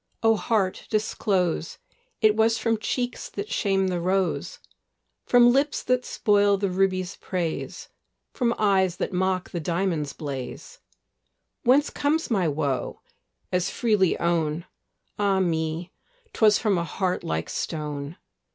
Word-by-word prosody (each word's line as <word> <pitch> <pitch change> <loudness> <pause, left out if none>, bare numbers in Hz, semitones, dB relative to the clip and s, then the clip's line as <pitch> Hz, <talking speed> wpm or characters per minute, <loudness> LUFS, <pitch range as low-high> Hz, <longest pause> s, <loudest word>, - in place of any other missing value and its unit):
O 225 0 +5
heart, 210 -4 -1
disclose! 190 -6 0 0.4
It 215 -1 +5
was 225 +1 +3
from 225 -2 0
cheeks 245 +2 -3
that 410 - -6
shame 195 -2 +1
the 175 -2 -2
rose, 185 +1 0 0.7
From 245 -1 +6
lips 280 +3 +1
that 255 0 +1
spoil 205 -1 +3
the 195 -1 -1
ruby's 185 -1 0
praise, 175 -4 -4 0.5
From 235 -2 0
eyes 190 -4 +2
that - - -3
mock 185 0 0
the 175 - -3
diamond's 165 -3 -1
blaze: 140 - -7 0.8
Whence 270 +4 +3
comes 295 0 0
my 190 -6 +2
woe? 140 -3 -2 0.5
as 180 -1 +1
freely 210 -7 +2
own; 170 -1 0 0.5
Ah 200 -2 +2
me! 165 0 -1 0.4
'twas 210 -2 +5
from 205 -6 +1
a - - -1
heart 180 +2 -2
like 80 0 -2
stone. 150 -1 -4
190 Hz, 130 wpm, -25 LUFS, 170-220 Hz, 0.8 s, From